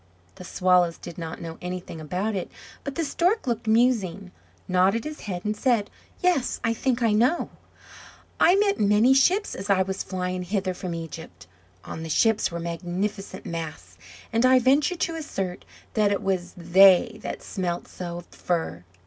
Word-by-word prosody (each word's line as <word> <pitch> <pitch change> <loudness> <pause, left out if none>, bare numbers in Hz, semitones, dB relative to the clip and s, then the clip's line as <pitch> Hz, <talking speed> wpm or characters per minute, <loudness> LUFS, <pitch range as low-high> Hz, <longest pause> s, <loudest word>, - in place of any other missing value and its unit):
The - - -11
Swallows 180 -2 +2
did 170 0 -9
not 165 -1 -6
know 165 -1 -7
anything 180 -2 -6
about 185 +8 -2
it; 190 -3 -4 0.3
but 280 -1 -5
the 330 - -1
Stork 360 +9 +1
looked 235 -2 -2
musing, 220 -5 +2 0.4
nodded 190 +5 +2
his 305 0 -6
head, 180 -2 -5
and 210 0 0
said: 235 -4 +1 0.3
"Yes, 355 -8 +1
I 230 - +2
think 245 +1 0
I 225 - +3
know; 245 +11 +2 0.9
I 355 - +6
met 400 0 +2
many 210 +5 +5
ships 365 +10 +3
as 195 +2 -6
I 190 -1 +4
was 190 +1 -4
flying 180 -1 -3
hither 190 0 -1
from 180 -1 -5
Egypt; 165 - -8 0.4
on 160 - -7
the 160 - -6
ships 220 +6 +3
were 170 - -4
magnificent 180 +4 -4
masts, 155 - -6 0.4
and 230 +1 +2
I 255 0 +6
venture 275 +8 +3
to 340 -1 -1
assert 195 - -4 0.3
that 210 -2 +2
it 200 - -1
was 185 -2 -2
they 190 +5 +5
that - - -6
smelt 175 -3 -3
so 175 -1 -6
of 175 - -9
fir. 160 - -3
195 Hz, 170 wpm, -25 LUFS, 175-235 Hz, 0.9 s, I